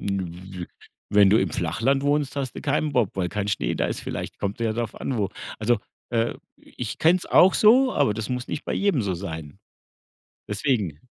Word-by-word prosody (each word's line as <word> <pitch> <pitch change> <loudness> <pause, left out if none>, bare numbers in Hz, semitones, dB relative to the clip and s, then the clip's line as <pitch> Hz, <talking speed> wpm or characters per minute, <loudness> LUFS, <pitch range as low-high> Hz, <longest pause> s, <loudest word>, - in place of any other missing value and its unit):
W 95 -2 -4 0.4
wenn 100 -2 +6
du 110 - +5
im - - 0
Flachland 115 - 0
wohnst, 145 -1 +1
hast 135 -3 -3
du - - -5
keinen 150 +1 0
Bob, 120 -7 +2
weil 90 -2 -1
kein 105 +1 -3
Schnee - - -1
da - - 0
ist. - - -3
Vielleicht - - -5
kommt 100 +2 -3
ja 115 -1 0
darauf 115 0 -4
an, 130 - -2
wo. 100 -3 0 0.3
Also, 110 +1 +2 0.3
äh, 115 -1 +1 0.2
ich 115 -4 -7
kenne 170 +3 +5
es - - -10
auch 185 +1 +6
so, 255 +5 +5
aber 105 - +2
das 110 -1 -4
muss 125 -1 -3
nicht - - -4
bei - - -3
jedem 195 - +1
so 95 -3 -1
sein. 80 -2 -7 0.9
Deswegen. 105 - -1
110 Hz, 200 wpm, -24 LUFS, 95-135 Hz, 0.9 s, wenn